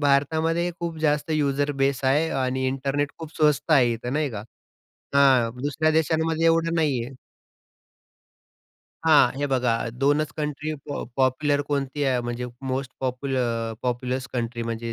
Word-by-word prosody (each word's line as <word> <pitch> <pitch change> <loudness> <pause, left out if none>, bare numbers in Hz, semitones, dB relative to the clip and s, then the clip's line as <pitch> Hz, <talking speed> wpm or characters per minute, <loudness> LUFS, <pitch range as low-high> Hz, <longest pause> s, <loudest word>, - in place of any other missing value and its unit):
भारतामध्ये 160 +4 +2
खूप 170 -1 -3
जास्त 150 0 +1
युझर 145 -1 +1
बेस 135 -1 +1
आहे 145 +5 +3 0.2
आणि 130 +1 -1
इंटरनेट 135 +2 -1
खूप 160 -1 -9
स्वस्त 150 -2 +2
आहे 120 -3 +5
इथं 120 +2 -5
नाही 150 -1 0
का. 105 -3 -6 0.7
हां, 130 -4 +5
दुसऱ्या 150 +2 +1
देशांमध्ये 160 +1 +1
एवढं 165 0 +2
नाही 145 -8 +1
आहे. 130 +2 -10 1.9
हां. 155 -6 +6
हे 145 - 0
बघा 125 -3 +1 0.3
2च 145 +2 +2
कंट्री 150 0 -3 0.2
पॉ 145 - -3
पॉप्युलर 140 +2 +2
कोणती 140 0 -2
आहे 130 -2 +2
म्हणजे 120 +1 -4 0.2
मोस्ट 130 0 -2
पॉप्युल 130 +1 -2
अ, 115 -2 -1
पॉप्युलस 125 +1 -2
कंट्री 120 -1 -3
म्हणजे 115 0 -4
140 Hz, 145 wpm, -24 LUFS, 125-155 Hz, 1.9 s, हां